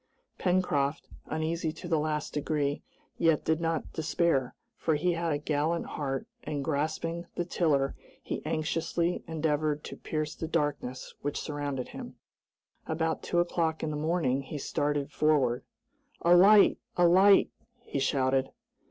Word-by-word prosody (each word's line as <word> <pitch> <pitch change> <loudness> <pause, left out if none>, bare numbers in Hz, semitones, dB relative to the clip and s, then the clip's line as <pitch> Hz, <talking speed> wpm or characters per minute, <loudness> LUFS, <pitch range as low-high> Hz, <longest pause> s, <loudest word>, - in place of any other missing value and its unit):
Pencroft, 165 -6 +1 0.2
uneasy 160 +1 -1
to 175 - -9
the 165 -3 +2
last 150 0 -2
degree, 145 -1 -1 0.4
yet 165 -3 +3
did 160 +1 +1
not 165 -1 -2
despair, 160 -4 +1 0.2
for 160 - 0
he 175 +5 +1
had 170 0 -1
a 145 - +1
gallant 150 +3 0
heart, 140 +6 -3 0.2
and 145 -2 -3
grasping 160 +3 -2
the 175 - -1
tiller 145 -6 +1 0.3
he - - -4
anxiously 165 +2 -1
endeavored 155 -2 0
to - - -7
pierce 155 -1 -3
the 160 - -5
darkness 145 -5 -2
which 145 0 -2
surrounded 145 -3 -3
them. - - -8 0.7
About 160 0 -1
two 175 - -2
o'clock 170 -2 +1
in 155 - -1
the - - -3
morning 150 -4 +1
he 135 +2 -6
started 145 0 -1
forward, 140 -7 +2 0.6
"A 175 +1 +6
light! 200 +3 +7 0.2
a 175 -1 +6
light!" 195 +3 +6 0.3
he 140 - -3
shouted. 135 -1 +1
155 Hz, 145 wpm, -29 LUFS, 145-170 Hz, 0.7 s, light